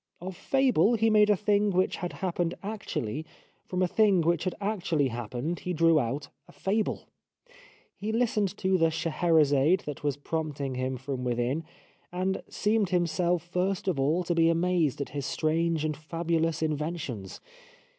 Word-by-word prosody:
Of 185 +1 -6
fable 240 - +3
he 225 0 +2
made 210 -1 +5
a 210 - +5
thing 205 +1 +2
which 185 -1 +1
had 175 - -4
happened 175 -1 -1
actually, 175 - -4 0.4
from 185 0 0
a - - +3
thing 200 -2 +3
which 170 +1 +1
had 185 - -1
actually 175 -9 0
happened 120 +8 -4
he 180 - -3
drew 165 -1 +4
out 140 +3 -2 0.2
a - - -15
fable. 210 +3 -1 0.9
He 210 +2 -4
listened 220 -5 0
to 190 0 +1
the 165 0 +4
Scheherazade 160 -1 +2
that 145 -1 -7
was 145 -1 0
prompting 145 -3 -3
him 130 +1 -2
from 130 0 -4
within, 125 +6 -1 0.5
and 185 +2 -1
seemed 210 -2 +1
himself 175 -1 +1
first 180 +2 -2
of 175 -7 0
all 155 +7 +2
to 175 - 0
be 165 -1 +4
amazed 165 -4 +1
at 140 - -4
his 140 0 -4
strange 160 0 0
and 155 -1 -1
fabulous 165 +1 -1
inventions. 150 - -3
170 Hz, 160 wpm, -28 LUFS, 150-185 Hz, 0.9 s, made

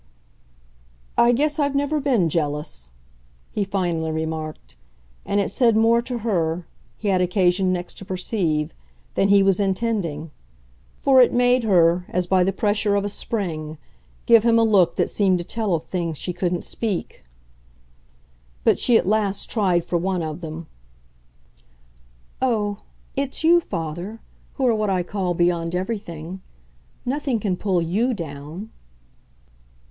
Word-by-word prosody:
"I 235 - +5
guess 295 +5 +1
I've 285 -1 +1
never 285 +2 +1
been 245 - +2
jealous," 150 - -3 0.6
he 210 - -1
finally 175 -5 -1
remarked. 155 - -5 0.5
And 200 - +1
it 200 - 0
said 230 -4 +3
more 230 +1 +4
to 245 +1 -4
her, 170 -5 0 0.3
he 210 - -2
had 185 -2 +2
occasion 180 0 +2
next 180 -1 -4
to 195 - -9
perceive, 180 -5 -1 0.4
than 195 - +2
he 200 0 +5
was 195 -1 +3
intending; 190 -6 -1 0.7
for 265 -2 +5
it 245 - +5
made 245 0 +3
her, 175 -3 +3
as 180 0 0
by 185 0 +3
the 190 - +1
pressure 205 +1 +1
of 200 0 0
a - - -1
spring, 160 -8 -4 0.5
give 230 -1 +7
him 230 +1 +3
a 230 - +4
look 195 -6 +4
that - - +1
seemed 190 -3 +2
to 175 - -4
tell 210 -1 -1
of 160 - -3
things 170 -4 -3
she 180 - -4
couldn't 175 0 -1
speak. 210 - -4 1.4
But - - +3
she 240 -2 +4
at - - -1
last 205 -1 0
tried 185 -6 +1
for 175 - 0
one 180 -1 -1
of 155 +2 -5
them. 160 0 -6 1.8
"Oh, 210 -5 0 0.4
it's 275 +2 -2
you, 340 +2 +6
father, 175 - -5 0.4
who 265 - 0
are 240 - +4
what 215 -1 0
I 185 -2 +1
call 180 -1 -2
beyond 175 0 +1
everything. 185 -3 -5 0.6
Nothing 270 -2 -1
can 195 -3 -1
pull 180 -2 0
YOU 225 +9 0
down." 160 +4 -7
190 Hz, 150 wpm, -22 LUFS, 170-225 Hz, 1.8 s, give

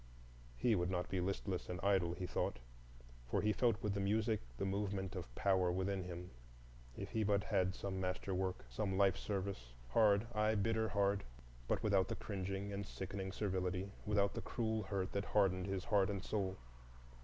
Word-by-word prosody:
He 115 - +3
would 90 -3 +1
not 95 - +1
like 90 - -1
to - - -17
be 95 -1 +1
listless 95 0 -2
and 90 0 -3
idle, 95 -4 +3
he 90 - -3
thought, 90 - -1 0.7
for - - +2
he 105 0 +3
felt 115 -2 +2
with 105 -2 +1
the 100 - -1
music 110 +2 +2 0.2
the 100 - -1
movement 100 0 -1
of 80 -10 -6
power 95 -3 +3
within 95 +1 0
him. 90 0 -6 0.7
If - - -5
he 110 - +1
but 100 -1 +2
had 90 0 +1
some 95 -1 -3
master 90 +1 -2
work, 95 0 -1
some 95 -3 -1
life 95 -1 +5
service, 95 - -3 0.2
hard,—aye, 110 - +3
bitter 110 +2 +1
hard, 100 0 +2 0.4
but - - 0
without 100 -3 +4
the - - -2
cringing 100 0 -3
and 100 +1 -2
sickening 95 -1 -4
servility, 95 -1 -1
without 105 -2 +2
the - - -3
cruel 110 -2 -1
hurt 95 -1 -2
that 100 0 -1
hardened 95 -3 +2
his 95 -1 -2
heart 100 -4 +3
and 100 -2 -2
soul. 95 -3 -1
100 Hz, 185 wpm, -38 LUFS, 95-105 Hz, 0.7 s, life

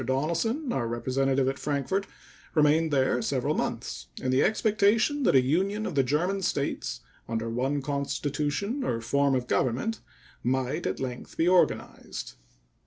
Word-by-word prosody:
Donelson, 170 - 0
our 120 -3 -1
representative 130 +3 +1
at 135 +1 -1
Frankfort, 150 +7 -1 0.5
remained 155 +1 +4
there 135 -2 +2
several - - 0
months - - -3
in 130 - -1
the 130 - +3
expectation 220 +6 +2
that 250 - +3
a 130 - +6
union 195 +10 0
of - - -3
the 140 - +4
German 170 +9 0
States 140 - -2 0.3
under 115 0 -2
one 135 +4 -1
constitution 145 - -2
or 115 - -1
form 140 +4 +2
of 125 -1 -1
government 130 - 0 0.4
might 130 +5 -1
at - - -2
length 125 -2 -6
be 165 - +2
organized. 180 0 +1
140 Hz, 145 wpm, -28 LUFS, 130-190 Hz, 0.5 s, a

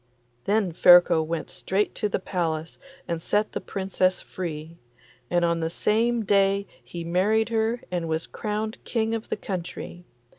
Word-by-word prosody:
Then 205 -3 +2
Ferko 175 -1 +7
went 160 0 -3
straight 200 +2 -1
to 210 - -1
the - - 0
palace 165 -4 -3 0.3
and 170 -1 -2
set 210 +5 0
the - - -4
Princess 190 -1 0
free, 165 -2 -6 0.5
and 175 -1 +2
on 170 0 +1
the 160 0 -1
same 225 +5 +1
day 200 0 +3 0.2
he 170 -1 -7
married 205 +7 +2
her 225 +1 0
and 170 -2 -2
was 160 +1 -1
crowned 215 +1 -4
King 225 -1 -1
of 225 -1 -4
the - - -1
country. 180 -1 -6
185 Hz, 155 wpm, -25 LUFS, 170-215 Hz, 0.5 s, Ferko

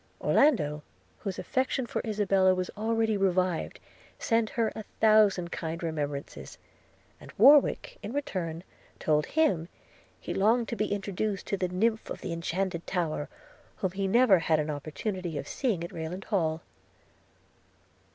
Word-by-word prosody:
Orlando, 150 - +2 0.4
whose 195 -3 -4
affection 260 -1 -1
for - - -3
Isabella 195 -4 +2
was 185 0 -3
already 220 0 0
revived, 185 -3 0 0.4
sent 230 -2 +1
her 230 -2 0
a - - -5 0.2
thousand 210 -5 +4
kind 165 +1 -4
remembrances; 145 -3 -4 0.6
and - - -12
Warwick, 290 - +5
in - - -6
return, 180 - -3 0.3
told 150 -1 +1
him, 285 - +1 0.5
'he - - -5
longed 225 +4 +2
to 235 - -2
be 215 -1 -1
introduced 200 0 -2
to 200 - -2
the 185 - 0
nymph 220 +5 0
of - - -6
the 175 - -4
inchanted 170 +1 -3
tower,' 165 -5 -2 0.5
whom 190 - -2
he 195 +1 -2
never 225 -2 +5
had 160 -1 +2
an 155 0 -1
opportunity 160 +4 -4
of - - -5
seeing 220 -11 -1
at 170 - -6
Rayland 165 +4 -5
Hall. 165 -6 -1
190 Hz, 140 wpm, -28 LUFS, 165-220 Hz, 0.6 s, Warwick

